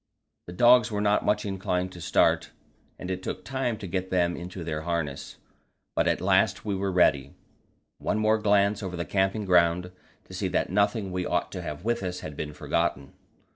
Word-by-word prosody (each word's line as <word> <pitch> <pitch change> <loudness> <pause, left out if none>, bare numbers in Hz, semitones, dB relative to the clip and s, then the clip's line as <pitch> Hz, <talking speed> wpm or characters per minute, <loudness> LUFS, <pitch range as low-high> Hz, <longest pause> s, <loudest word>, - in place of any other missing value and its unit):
The 85 - -7
dogs 120 +3 +5
were 105 -2 -2
not 105 0 +2
much 105 0 +1
inclined 95 -2 -2
to 90 - -11
start, - - +2 0.5
and 90 - -6
it 95 0 -3
took 95 0 -5
time 130 -1 -2
to 105 - -8
get 95 +1 -3
them 85 -1 +1
into 90 0 -7
their 75 -1 -3
harness, 80 -4 -3 0.6
but - - +2
at - - +1
last 95 +2 +2
we 105 - -1
were 95 0 -1
ready. 70 -7 +2 0.6
One - - -1
more 110 0 +2
glance 100 0 +2
over 95 -3 -5
the 85 - -3
camping 95 +2 0
ground 90 0 +3 0.3
to - - -13
see - - -2
that - - -1
nothing 100 0 +1
we 90 0 -2
ought 90 - -1
to 90 - -5
have 75 +2 -7
with 120 -2 0
us 90 -1 -4
had 75 - -7
been 75 +1 -5
forgotten. 70 -1 -2
95 Hz, 195 wpm, -27 LUFS, 85-105 Hz, 0.6 s, dogs